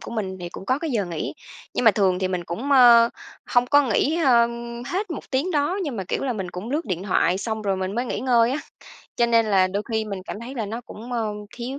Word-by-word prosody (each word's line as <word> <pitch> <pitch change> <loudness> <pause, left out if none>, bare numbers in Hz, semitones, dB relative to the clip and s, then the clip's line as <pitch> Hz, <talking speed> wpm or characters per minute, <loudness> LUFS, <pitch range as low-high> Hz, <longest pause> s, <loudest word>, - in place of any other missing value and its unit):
của - - -9
mình 190 -5 -4
thì 175 - -5
cũng 190 - -10
có 260 +2 +1
cái 320 -2 -3
giờ 215 -5 0
nghỉ. 170 -3 -4 0.4
Nhưng - - 0
mà 220 - +9
thường 190 -2 +1
thì 185 -1 -1
mình 180 -2 -3
cũng, 230 - -4
ơ, 240 -3 +8 0.4
hông 245 0 +2
có 290 +3 +5
nghỉ, 270 +6 +1
ơ, 240 -7 +5 0.4
hết 385 +1 -3
1 315 - -7
tiếng 280 +7 0
đó. 310 +4 0
Nhưng 280 -8 -4
mà, 190 - -3
kiểu - - -2
là, 255 - 0
mình 190 -5 -5
cũng 190 +8 -7
lướt 310 +4 -1
điện 185 -2 -3
thoại 185 -2 +1
xong 220 0 -3
rồi 195 -2 0
mình 190 +2 -3
mới 240 +2 -1
nghỉ - - -3
ngơi 240 -2 +3
á, 275 - -1 0.6
cho 235 - +3
nên 230 -1 +3
là 190 -3 +4
đôi 200 +3 -2
khi 220 -1 0
mình 200 -3 -6
cảm 205 +3 -7
thấy 250 +4 -8
là 220 -4 -3
nó 225 +4 -5
cũng, 235 +1 -10
ơ, 225 -3 -1 0.3
thiếu 255 +3 -5
230 Hz, 265 wpm, -23 LUFS, 195-260 Hz, 0.6 s, mà